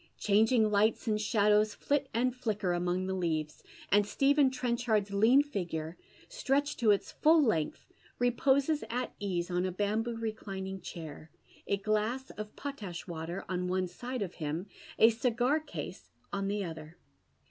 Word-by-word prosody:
Changing 220 +2 +3
lights 210 +2 +2
and 215 -1 +1
shadows 210 -1 +3
Hit 285 -1 +2
and 245 +2 +1
Uicker 210 -7 -1
among 180 +1 -1
the 190 - -2
leaves, 160 -4 -2 0.3
and 205 +2 +5
Stephen 275 +6 +3
Trencliard's 235 -5 0
lean 230 +8 +5
figure, 170 - -4 0.3
stretched 290 - 0
to 230 -3 +3
its 200 -1 +2
full 320 +2 +4
length, 215 - 0 0.3
reposes 270 +5 +2
at 245 +2 -2
ease 185 -3 -2
on 180 0 +1
a 185 - -1
bamboo 215 +5 -1
roclining 195 -4 -5
chair, 160 -2 -8 0.4
a 200 - +1
glass 215 +6 -1
of 210 0 -8
potash 215 -12 -6
water 170 +1 -5
on 180 -1 -2
one 185 0 0
side 245 +6 -4
of 180 - -6
him, 155 +4 -2 0.3
a 225 - +7
cigar 245 +5 +1
case 310 - -8 0.2
on 195 -1 -1
tlie 200 -2 -1
other. 160 +1 -9
210 Hz, 150 wpm, -31 LUFS, 185-245 Hz, 0.4 s, a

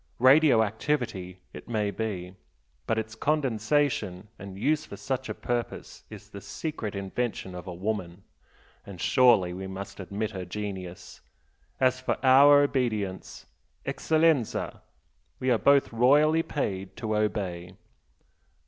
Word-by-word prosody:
Radio 130 -2 +6
activity 105 -5 -2
it - - -11
may 105 -3 0
be 95 -5 -4 0.5
but 115 - +1
its 110 0 -3
condensation 125 -7 0
and 95 0 -9
use 150 +8 +1
for - - -10
such 130 -1 -3
a - - -2
purpose 120 -1 -4
is - - -11
the 100 - -9
secret 110 - -5
invention 100 0 -3
of 90 +1 -8
a 90 - -5
woman 95 -2 -4 0.6
and 95 -3 -11
surely 110 -8 +4
we 95 +1 -6
must 95 +2 -8
admit 100 +3 -4
her 95 -3 -5
genius! 95 -1 -7 0.6
As 130 -1 +2
for 130 - -1
our 145 +2 +7
obedience 110 -9 -2 0.4
ECCELLENZA, 155 -6 +1 0.6
we 130 0 +1
are 115 - +3
both 140 -3 +4
royally 145 +7 +4
paid 95 - -4
to 110 -1 -2
obey!" 95 -4 -2
110 Hz, 130 wpm, -27 LUFS, 95-130 Hz, 0.6 s, our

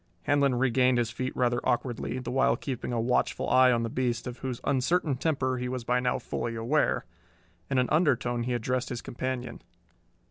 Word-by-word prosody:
Handlon 140 -2 +2
regained 125 0 +3
his 120 -1 0
feet 130 +2 -3
rather 120 -1 +2
awkwardly, 125 0 -1
the 125 -1 -5
while 135 +1 +3
keeping 130 -3 -4
a 120 - 0
watchful 125 +2 0
eye 130 0 +6
on 120 -1 +1
the - - -1
beast, 120 -1 -1
of 125 -1 -6
whose 130 -2 -4
uncertain 140 +2 +1
temper 130 -3 0
he 125 0 -3
was 125 -1 -4
by 125 +2 +1
now 125 0 0
fully 115 -1 -4
aware. 120 +7 +1 0.6
In 135 - 0
an 125 0 +3
undertone 125 -7 +2
he 125 +1 -1
addressed 125 +2 -1
his 120 -2 -5
companion. 130 0 -4
125 Hz, 185 wpm, -28 LUFS, 120-130 Hz, 0.6 s, eye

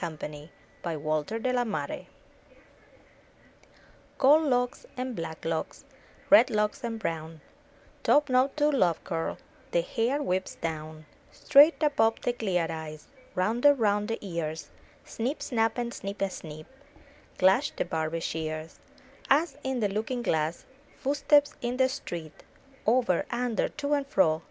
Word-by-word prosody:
327 155 -2 -5 1.3
M 240 -3 -1
Y - - +1
BOOK - - -4
HOUSE - - -16 2.1
Gold 300 +4 +5
locks, 250 -1 0
and 255 -1 -3
black 160 -3 -6
locks, 165 -1 -3 0.5
Red 290 -3 +8
locks 210 -1 0
and 230 -1 -3
brown, 160 -4 -4 0.6
Topknot 270 -1 +3
to 300 0 +3
love 180 - +2
curl, 165 -3 -3 0.3
The 170 - +2
hair 245 +10 0
wisps 185 -3 -1
down; 155 -1 -5 0.3
Straight 300 +3 +5
above 225 -7 +3
the 245 - 0
clear 190 -8 0
eyes. 155 -1 -7 0.3
Rounded 235 +10 +4
round 210 -4 +1
the 225 - -2
ears. 165 -4 -4 0.3
Snip 250 +7 -3
snap 225 -2 0
and 240 -1 -2
snick 200 +1 -6
a 195 - 0
snick. 155 -2 -9 0.7
Clash 190 +10 +4
the - - -1
Barber's 165 0 -2
shears; 155 0 -4 0.5
Us, 290 +1 +3
in 265 -2 -1
the 205 - +2
looking 240 +3 -2
glass. 160 -3 -1 0.3
Footsteps 290 +1 +3
in 245 +1 -2
the 260 0 +4
street. 160 - -7 0.5
Over, 235 -6 +2
under, 240 -2 0
to 295 -1 -2
and 285 -1 0
fro. 160 - +3
225 Hz, 135 wpm, -28 LUFS, 165-260 Hz, 2.1 s, Red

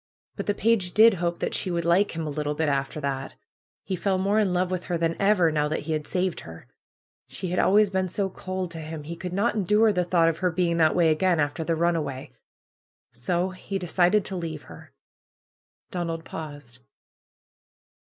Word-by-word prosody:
But - - -5
the 205 - +1
page 205 -5 +1
did 225 +1 +7
hope 170 0 0
that - - -3
she - - -1
would 170 -1 -1
like 175 +2 +2
him 165 -1 -3
a - - -3
little 150 0 -2
bit 160 +1 0
after 140 +1 -1
that. 135 -1 -3 0.5
He 190 - -3
fell 190 +2 0
more 200 +3 +2
in 205 -4 +2
love 180 +1 0
with 185 -1 -3
her 175 - -1
than'^ever, 170 +1 +2
now 150 -1 +1
that 155 - -2
he 160 - -5
had 155 -1 -3
saved 185 -1 -1
her. 80 0 -11 0.6
She 185 - -6
had 180 - 0
always 205 0 +4
been 190 -1 0
so 195 +2 0
cold 185 -1 -5
to 165 - -7
him. 155 -1 -7
He 165 +3 -6
could 180 +1 -6
not 200 +6 +1
endure 210 +2 +3
the 180 -2 +1
thought 170 -1 +3
of 165 0 0
her 185 - +2
being 170 0 0
that 160 -2 +3
way 170 -2 +4
again, 170 +2 +2
after 145 +2 -1
the 165 +1 0
run 170 +1 +2
away. 140 -5 -4 0.8
So 175 +10 -1
he 185 +1 -5
decided 180 +2 +2
to 195 - -5
leave 165 -4 -5
her." - - -13 1.0
Donald 165 -2 -3
paused. 145 -6 -8
175 Hz, 200 wpm, -25 LUFS, 160-185 Hz, 1.0 s, did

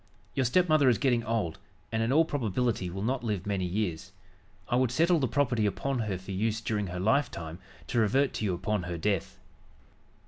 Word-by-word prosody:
Your 130 - +1
stepmother 155 0 +4
is 120 - +3
getting 120 -4 +2
old, 110 -7 -2 0.3
and, 110 - 0
in 115 +2 +1
all 160 +4 +5
probability, 120 - -1
will 95 +3 -5
not 125 +2 -1
live 105 -6 -2
many 100 -3 -1
years. 90 -3 -2 0.6
I - - 0
would 130 -1 +3
settle 165 +7 +3
the 130 - +1
property 120 -5 +1
upon 135 +6 -2
her 105 -4 -1
for 95 +2 -9
use 110 +3 0
during 105 -3 -2
her 90 0 -5
lifetime, 95 - 0 0.3
to 120 - 0
revert 130 +5 +2
to 110 - -2
you 95 -3 0
upon 100 +3 -1
her 85 -1 -4
death." 100 +1 -1
110 Hz, 195 wpm, -29 LUFS, 95-130 Hz, 0.6 s, all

